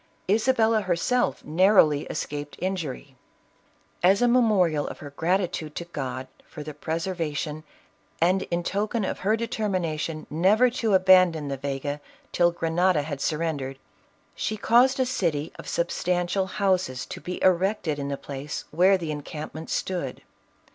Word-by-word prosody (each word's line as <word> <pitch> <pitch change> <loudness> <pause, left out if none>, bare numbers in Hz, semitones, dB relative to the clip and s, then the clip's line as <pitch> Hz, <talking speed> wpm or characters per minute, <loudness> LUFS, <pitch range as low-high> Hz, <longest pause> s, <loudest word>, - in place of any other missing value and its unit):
Isabella 225 +1 +3
herself 190 +7 0
narrowly 160 -3 +4
escaped 145 0 -5
injury. 160 -8 -4 0.9
As 190 +3 +5
a 245 - +3
memorial 205 -11 +3
of - - -7
her 145 -2 -9
gratitude 165 -1 -1
to 170 - -4
God 130 -6 -5 0.2
for 150 - -8
the 150 0 -7
preservation, 160 -1 -3 0.6
and 185 +3 +3
in 175 0 -1
token 210 +3 -1
of - - -3
her 215 +4 +1
determination 180 -9 -2
never 205 +10 +4
to 225 -4 +1
abandon 185 -5 +5
the 135 - -3
Vega 140 +1 -4 0.3
till 175 -1 +4
Grenada 170 -1 +1
had 145 -2 -5
surrendered, 150 -4 -2 0.6
she 215 - -3
caused 250 +5 +4
a 260 - +3
city 170 - -1
of - - -9
substan 180 +1 0
tial 190 +2 -1
houses 185 -11 0
to - - -8
be 180 +5 -5
erected 185 -4 +2
iu 140 0 -3
the 140 - -2
place 140 +2 -6
where 185 +5 +4
the 165 -4 -4
en 150 -1 -4
campment 155 +2 -7
stood. 175 -9 -3
170 Hz, 145 wpm, -25 LUFS, 150-195 Hz, 0.9 s, As